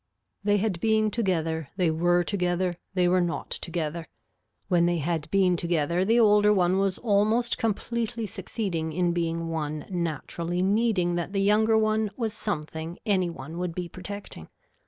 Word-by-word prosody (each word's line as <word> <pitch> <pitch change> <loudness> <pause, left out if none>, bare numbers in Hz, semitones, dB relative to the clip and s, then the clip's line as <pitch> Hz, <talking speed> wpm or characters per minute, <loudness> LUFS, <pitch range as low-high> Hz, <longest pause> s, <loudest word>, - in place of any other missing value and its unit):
They 205 0 +3
had 200 -4 -1
been 215 +1 +2
together, 165 - -1
they 175 -4 +2
were 175 +2 +2
together, 180 -1 0 0.2
they 180 -1 +3
were 180 +1 +3
not 175 -1 -3
together. 165 -1 -3 0.6
When 175 -3 +3
they 175 0 +1
had 160 0 -2
been 190 -2 +3
together 170 0 0
the 225 +5 +3
older 210 -2 +5
one 185 -1 +3
was 195 -1 0
almost 225 +3 +1
completely 230 0 -2
succeeding 180 -6 -3
in 175 +1 +1
being 165 -1 -2
one 155 -2 -3
naturally 170 +1 -2
needing 200 -3 +2
that 175 +3 -3
the 195 - +1
younger 215 +2 +4
one 215 0 +1
was 225 -4 -2
something 160 -5 -4
any 185 -4 +2
one 160 +1 -8
would 180 -2 -3
be 180 -1 -3
protecting. 200 +3 -8
180 Hz, 155 wpm, -26 LUFS, 170-210 Hz, 0.6 s, older